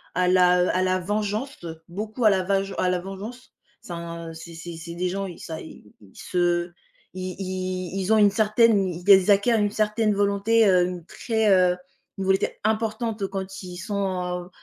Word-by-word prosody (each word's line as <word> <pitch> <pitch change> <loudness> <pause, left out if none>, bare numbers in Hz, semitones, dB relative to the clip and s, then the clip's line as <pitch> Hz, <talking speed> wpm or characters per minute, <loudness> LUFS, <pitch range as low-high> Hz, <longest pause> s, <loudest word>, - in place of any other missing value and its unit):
à 180 0 +2
la, 180 -1 +5
heu - - +1
à 185 - +1
la 185 0 +2
vengeance, 210 +4 -3 0.2
beaucoup 215 +6 -4
à 215 - +7
la 190 -1 +2
vage 195 +1 0
à 185 - +2
la 180 - +1
vengeance. 200 +7 -9 0.3
Ça 175 - -8
un 170 -1 -7
c'est 160 +1 -10
c'est 170 +1 -8
c'est 170 +1 -8
des 180 +1 -1
gens 195 +1 -3
ils 175 - -10
ça, 160 -1 -7
ils 105 -9 -13 0.2
se 175 -1 0 0.4
i 185 0 -5
i 185 0 -3
ils 195 +3 +1
ont - - +5
une 205 -1 +6
certaine 215 -1 +3
ils 185 +3 +4
acquièrent 215 +3 +3
une 205 -1 +1
certaine 215 0 +1
volonté, 205 +3 +2
hem, 180 -3 +3
très, 220 +2 -1
heu 180 -1 +4 0.4
une 195 - -3
volonté 190 +1 +2
importante, 220 -1 -1
quand 190 0 -6
ils 180 -1 -8
sont 200 +2 -2
à 180 -1 -2
heu 180 - -16
190 Hz, 190 wpm, -24 LUFS, 180-210 Hz, 0.4 s, à